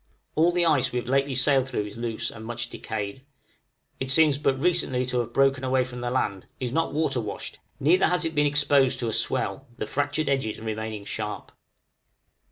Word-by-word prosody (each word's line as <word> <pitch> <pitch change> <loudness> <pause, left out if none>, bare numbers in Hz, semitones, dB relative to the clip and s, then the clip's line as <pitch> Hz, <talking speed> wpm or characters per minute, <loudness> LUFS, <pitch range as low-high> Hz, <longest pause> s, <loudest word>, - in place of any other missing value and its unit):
All 165 +3 +4
the 175 0 +2
ice 150 -6 +3
we 125 - -2
have 120 - -3
lately 135 +1 +1
sailed 135 0 +3
through 105 -5 -2
is 105 - -9
loose, 115 -1 -3
and 110 - -10
much 120 +1 -4
decayed; 105 +3 -5 0.8
it 130 - -3
seems 145 0 +4
but 135 -2 +1
recently 140 -6 +1
to 125 0 -1
have 120 -1 -2
broken 135 +1 +3
away 130 0 +2
from 125 -1 -7
the 120 - -1
land, 100 -7 -1
is 125 -3 -2
not 165 +5 0
water 145 -4 0
washed, 105 - -6 0.2
neither 175 +7 +4
has 180 -1 +1
it 165 - -2
been 150 -1 +3
exposed 145 -2 +3
to 115 - 0
a - - -2
swell, 130 +4 -1
the - - -3
fractured 145 +2 -1
edges 135 -6 0
remaining 110 -1 -4
sharp. 105 0 -5
130 Hz, 195 wpm, -26 LUFS, 115-145 Hz, 0.8 s, All